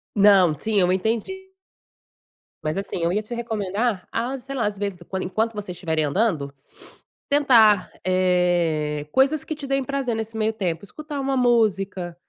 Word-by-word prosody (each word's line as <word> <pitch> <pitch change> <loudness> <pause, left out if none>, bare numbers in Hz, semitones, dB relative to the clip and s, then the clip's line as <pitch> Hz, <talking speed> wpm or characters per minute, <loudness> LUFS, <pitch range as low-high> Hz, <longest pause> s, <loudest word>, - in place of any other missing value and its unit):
Não, 195 -5 +6
sim, 215 +1 0
eu 180 -1 +3
entendi. 235 - -2 1.1
Mas 155 +3 -2
assim, 195 -1 -4
eu 170 - +2
ia 210 - 0
te 220 +3 -7
recomendar 215 -2 -2
a, 245 +4 -2
sei 270 +2 -8
lá, 245 - 0
às 205 -1 -2
vezes, 200 -2 -3
quando 190 -1 -3
enquanto 220 +5 -1
vocês 200 -4 -6
tiverem 160 -4 -1
andando, 150 -4 0 0.8
tentar, 230 -9 +5
eh, 175 -5 +1
coisas 270 - +3
que 315 - -5
te 295 -2 -8
deem 275 0 0
prazer 265 -2 -2
nesse 225 0 -5
meio 220 0 +1
tempo, 180 -5 -3
escutar 300 +6 -7
uma 275 0 -1
música 195 -7 +1
210 Hz, 160 wpm, -23 LUFS, 180-245 Hz, 1.1 s, Não